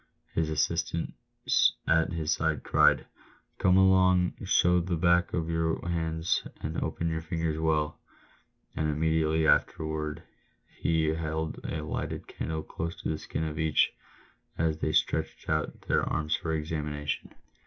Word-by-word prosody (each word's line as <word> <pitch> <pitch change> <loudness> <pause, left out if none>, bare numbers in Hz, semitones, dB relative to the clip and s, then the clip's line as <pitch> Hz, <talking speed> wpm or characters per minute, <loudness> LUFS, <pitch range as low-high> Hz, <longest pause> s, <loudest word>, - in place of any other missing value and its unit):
His 80 -1 0
assistant 80 +2 -1 0.7
at 80 -1 +3
his 80 -2 -1
side 80 -4 -1
cried, - - +4 0.3
" - - -35
Come 90 0 +4
along, 95 -1 +5
show 90 0 +4
the 90 0 -1
back 85 +1 +3
of 80 -2 -1
your 80 0 0
hands 80 -1 0 0.2
and - - -3
open 85 - -2
your 80 -1 -1
fingers 80 -1 -2
well 75 -2 0 0.4
;" - - -40
and 80 0 0
immediately 80 +1 +1
afterwards 80 -1 +1 0.4
he 80 -1 0
held 80 0 -2
a 75 - -3
lighted 75 - -4
candle 80 -1 -4
close 85 +2 -5
to - - -1
the 80 - -2
skin 80 - -4
of 75 0 -4
each, 80 -2 +3 0.6
as 80 -1 0
they 80 - 0
stretched - - 0
out 80 -1 -1
their - - +1
arms 75 0 0
for 80 - -3
examination. 75 -2 -3
80 Hz, 145 wpm, -29 LUFS, 80-85 Hz, 0.7 s, along